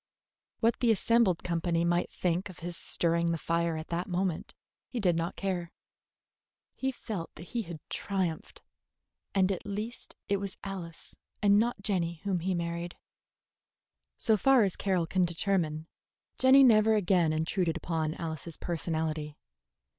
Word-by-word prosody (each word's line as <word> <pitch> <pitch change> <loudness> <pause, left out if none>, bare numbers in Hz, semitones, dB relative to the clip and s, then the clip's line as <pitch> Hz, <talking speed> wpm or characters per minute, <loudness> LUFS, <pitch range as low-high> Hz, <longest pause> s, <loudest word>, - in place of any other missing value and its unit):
What 230 0 +2
the 240 - +2
assembled 225 -4 +3
company 170 -1 0
might 175 +1 +1
think 180 +2 -1
of 185 - -11
his 175 -1 -3
stirring 170 0 +1
the 165 - 0
fire 170 0 0
at 155 - -7
that 175 +3 -2
moment 180 -2 -2 0.3
he 250 - -4
did 180 -5 +2
not 165 +1 -2
care. 180 -3 -3 1.0
He 265 0 -1
felt 210 -8 -5
that 170 - -11
he 235 - -1
had 170 -6 -7
triumphed; 185 -5 -3 0.7
and 190 0 +4
at 190 - -3
least 210 +4 -6
it 200 - +2
was 195 -1 -5
Alice 180 -4 -7 0.3
and 205 0 +6
not 230 -3 0
Jenny 175 -4 0
whom 195 -3 0
he 185 +2 -1
married. 170 0 -3 1.2
So 220 -1 +3
far 265 +3 +5
as 195 -3 0
Carroll 185 -4 0
can 185 +3 +1
determine, 170 -3 0 0.5
Jenny 265 +1 +7
never 220 -3 +6
again 180 -5 +3
intruded 165 +2 0
upon 160 -2 -2
Alice's 160 -1 -5
personality. 160 -3 -2
175 Hz, 145 wpm, -30 LUFS, 165-200 Hz, 1.2 s, Jenny